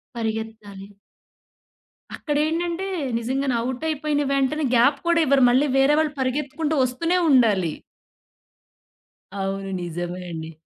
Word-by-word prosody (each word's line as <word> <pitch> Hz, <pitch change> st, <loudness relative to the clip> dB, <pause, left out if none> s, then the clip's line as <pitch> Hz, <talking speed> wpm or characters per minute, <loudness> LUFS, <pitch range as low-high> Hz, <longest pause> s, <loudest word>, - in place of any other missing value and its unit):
పరిగెత్తాలి. 220 Hz, -3 st, -5 dB, 1.3 s
అక్కడేంటంటే, 330 Hz, +5 st, -1 dB, 0.3 s
నిజంగానే 260 Hz, +2 st, -1 dB
ఔటయిపోయిన 295 Hz, +2 st, -1 dB
వెంటనే, 275 Hz, +2 st, +1 dB
గ్యాప్ 245 Hz, +5 st, +4 dB
కూడా 340 Hz, -1 st, +3 dB
ఇవ్వరు. 275 Hz, -2 st, +4 dB
మళ్ళీ 265 Hz, +4 st, +3 dB
వేరే 270 Hz, +2 st, +4 dB
వాళ్ళు 305 Hz, -2 st, 0 dB
పరిగెత్తుకుంటూ 290 Hz, +4 st, -1 dB
వస్తూనే 330 Hz, +8 st, 0 dB
ఉండాలి. 210 Hz, -, +3 dB, 1.6 s
అవును. 195 Hz, 0 st, -3 dB
నిజమే 175 Hz, +1 st, -5 dB
అండి. 160 Hz, 0 st, -6 dB
260 Hz, 95 wpm, -23 LUFS, 215-300 Hz, 1.6 s, గ్యాప్